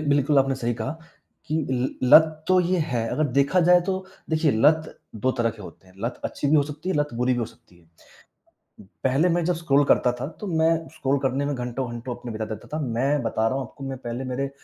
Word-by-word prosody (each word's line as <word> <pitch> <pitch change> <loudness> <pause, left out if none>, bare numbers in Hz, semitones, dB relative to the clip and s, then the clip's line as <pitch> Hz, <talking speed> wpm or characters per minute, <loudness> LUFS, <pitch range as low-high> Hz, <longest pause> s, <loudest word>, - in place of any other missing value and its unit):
बिल्कुल 145 0 +3
आपने 135 0 +2
सही 120 -2 -2
कहा - - -4 0.6
कि 155 - -1
ल 130 0 0 0.3
लत 155 -1 +6
तो 185 - +5
यह 180 -1 +1
है। 115 -2 0
अगर 155 - +1
देखा 140 +7 +3
जाए 180 0 +7
तो 190 -1 -2 0.3
देखिए 155 -1 +2
लत 155 +8 +2 0.2
2 130 +5 +1
तरह 115 -1 +2
के 110 -2 -12
होते 95 0 -13
हैं। 95 - -20
लत 120 +1 -4
अच्छी - - -3
भी 155 - +5
हो 145 - +5
सकती 150 +4 -7
है, 190 - 0
लत 145 0 +1
बुरी 125 +2 +1
भी 125 - -1
हो - - 0
सकती 90 - -20
है। 85 - -26 1.2
पहले 135 +7 +3
मैं 175 0 +1
जब 180 +2 +1
स्क्रॉल 145 -4 +2
करता 125 -2 +3
था, 125 +2 -5
तो 185 +6 -9
मैं 160 -3 +2 0.2
स्क्रॉल 140 -2 0
करने 135 +2 0
में 145 - -1
घंटों-घंटों 125 -1 -4
अपने 120 -1 -7
बिता 110 0 -3
देता 105 - -14
था। - - -3
मैं 135 +2 0
बता 110 -1 0
रहा 130 - -2
हूँ - - -2
आपको, 135 - -11
मैं 135 -1 -5
पहले 120 +1 -5
मेरे 135 +2 -3
135 Hz, 235 wpm, -24 LUFS, 120-155 Hz, 1.2 s, जाए